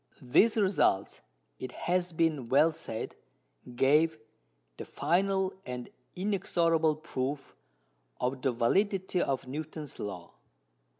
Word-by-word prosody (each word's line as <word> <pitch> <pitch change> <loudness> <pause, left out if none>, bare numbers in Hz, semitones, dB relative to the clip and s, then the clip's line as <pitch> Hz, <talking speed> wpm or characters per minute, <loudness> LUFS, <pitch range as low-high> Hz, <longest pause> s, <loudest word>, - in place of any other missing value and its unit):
These 180 - +4
results, 185 - +2 0.4
it 130 - -6
has 180 0 -1
been 155 -7 0
well 150 +5 +5
said, 135 -8 -6 0.6
gave 155 +5 +4 0.6
"the - - -5
final 190 +2 +1
and 125 -4 -6 0.2
inexorable 170 -5 +1
proof" 140 -2 -4 0.6
of 130 +1 -1
the 130 - +2
validity 185 - +1
of 135 -1 -1
Newton's 150 +1 -6
Law. 90 -4 -6
155 Hz, 105 wpm, -30 LUFS, 130-180 Hz, 0.6 s, well